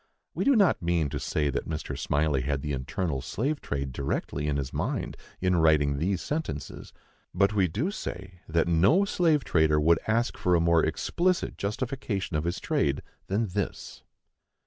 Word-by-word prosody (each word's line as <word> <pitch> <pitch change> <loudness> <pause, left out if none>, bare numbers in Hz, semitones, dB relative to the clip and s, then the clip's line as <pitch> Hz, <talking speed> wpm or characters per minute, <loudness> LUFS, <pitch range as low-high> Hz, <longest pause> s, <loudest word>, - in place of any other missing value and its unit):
We - - -2
do 280 - +5
not 195 - +4
mean 85 -3 +1
to - - -4
say 75 -2 0
that - - -3
Mr. 75 -1 -4
Smylie 75 -2 +1
had 70 +1 -2
the 75 - -2
internal 70 +2 -2
slave 140 - -2
trade 70 -2 -3
directly 70 +2 -2
in 70 -1 0
his 65 -2 -4
mind - - -2 0.2
in 90 -1 +2
writing 75 -3 +3
these 90 +2 0
sentences; 145 - -4 0.4
but 100 +2 +3
we 100 -3 +3
do 125 - -2
say 90 - -7
that 85 +1 +2
no 95 - +4
slave 165 -7 +2
trader 80 -6 +3
would 80 +2 +4
ask 115 +3 +1
for 90 -1 +2
a - - +4
more 85 -1 +3
explicit 185 +1 0
justification 105 - -3
of 75 +1 0
his 85 +1 -1
trade 70 -1 0 0.2
than 105 +2 0
this. 100 +1 -4
85 Hz, 170 wpm, -27 LUFS, 75-105 Hz, 0.4 s, do